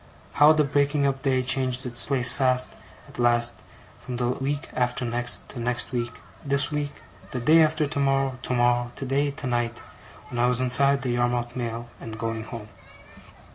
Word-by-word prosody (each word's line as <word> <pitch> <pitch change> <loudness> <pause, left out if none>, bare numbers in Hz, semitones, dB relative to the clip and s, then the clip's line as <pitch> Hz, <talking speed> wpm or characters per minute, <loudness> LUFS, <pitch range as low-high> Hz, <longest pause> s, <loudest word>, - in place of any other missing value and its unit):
How 150 +1 +6
the 155 -1 +3
breaking 145 0 +1
up 135 -1 -1
day 130 -2 +1
changed 130 0 +1
its 120 -1 -1
place 125 -4 +2
fast, 130 -1 +1 0.3
at - - -13
last, 120 0 +2 0.4
from 125 -1 -6
the 120 0 0
week 140 +3 -2
after 125 0 -1
next 120 +1 0
to 125 - -8
next 120 +1 -1
week, 120 -2 -2 0.3
this 140 0 +2
week, 145 -1 -4 0.3
the 125 - -4
day 155 +7 +5
after 155 0 +2
tomorrow, 135 -2 0
tomorrow, 120 -1 +1
today, 140 +2 0
tonight 120 -4 -3 0.5
when 120 - -4
I 120 - +3
was 125 0 +3
inside 135 +2 +3
the 125 - -1
Yarmouth 120 0 -1
mail, 120 -1 -4
and 110 -1 -8
going 115 -1 -4
home. 110 -3 -8
125 Hz, 170 wpm, -25 LUFS, 120-140 Hz, 0.5 s, How